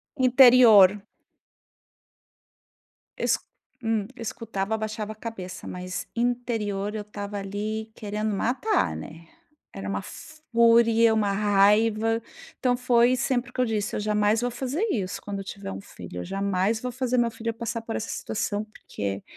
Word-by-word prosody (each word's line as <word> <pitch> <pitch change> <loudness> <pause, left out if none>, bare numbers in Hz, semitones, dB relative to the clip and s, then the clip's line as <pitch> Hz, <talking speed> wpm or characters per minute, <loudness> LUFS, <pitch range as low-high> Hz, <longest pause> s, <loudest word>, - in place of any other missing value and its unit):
Interior. 245 -7 +7 2.1
Es - - +1 0.4
hum, 225 -3 0
escutava, 220 -3 -3
abaixava 215 -1 -4
a - - -21
cabeça, 215 -5 -7
mas 180 0 -5
interior 225 -4 -1
eu 215 - -3
estava 205 0 -6
ali 215 +3 -4
querendo 210 0 -3
matar, 220 - 0
né. 160 - -9 0.5
Era 95 0 -6
uma 100 0 -2
fúria, 230 -6 +3
uma 210 -2 +1
raiva, 210 +3 +3 0.4
então 250 -1 +2
foi 245 0 +4
sempre 245 0 -1
o - - -35
que 255 - -1
eu - - +3
disse: 215 -2 -2
"Eu - - -1
jamais 210 +1 +2
vou 245 - 0
fazer 265 - -3
isso, 190 - -3
quando 200 -1 -5
eu - - -5
tiver 195 - -7
um 95 0 -6
filho, 90 -2 -9
eu - - -6
jamais 195 +2 0
vou 250 -1 -3
fazer 255 0 -1
meu 240 -1 +3
filho 230 +1 -4
passar 230 0 -4
por 225 0 -5
essa 225 - -4
situação", 205 -1 -2
porque 100 - -6
215 Hz, 150 wpm, -26 LUFS, 200-235 Hz, 2.1 s, Interior